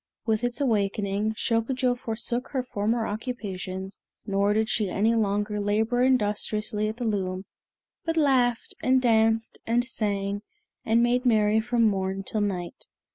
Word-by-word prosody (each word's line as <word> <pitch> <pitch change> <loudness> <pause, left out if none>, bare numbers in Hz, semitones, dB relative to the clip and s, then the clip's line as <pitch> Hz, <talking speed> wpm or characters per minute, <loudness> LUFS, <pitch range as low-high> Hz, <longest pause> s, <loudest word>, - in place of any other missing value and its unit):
With 220 0 0
its 245 +2 -1
awakening, 210 -3 0
Shokujo 245 +3 +1
forsook 235 +1 -3
her 260 -2 0
former 225 -1 -1
occupations, 195 -4 -5 0.2
nor 200 0 +1
did 220 +1 +1
she 210 -3 0
any 215 +5 +2
longer 210 -1 0
labor 220 +4 +1
industriously 215 -3 +1
at 220 - -6
the 245 - -4
loom, 190 -3 -2 0.6
but 330 0 -2
laughed, 255 -6 +2
and 260 +1 +4
danced, 225 -2 +2
and 240 +2 +2
sang, 205 -4 -1 0.4
and 230 +1 +3
made 245 +1 +2
merry 215 -3 +3
from 240 +1 +1
morn 195 -2 0
till 215 +2 -2
night. 185 0 -3
220 Hz, 140 wpm, -26 LUFS, 205-240 Hz, 0.6 s, and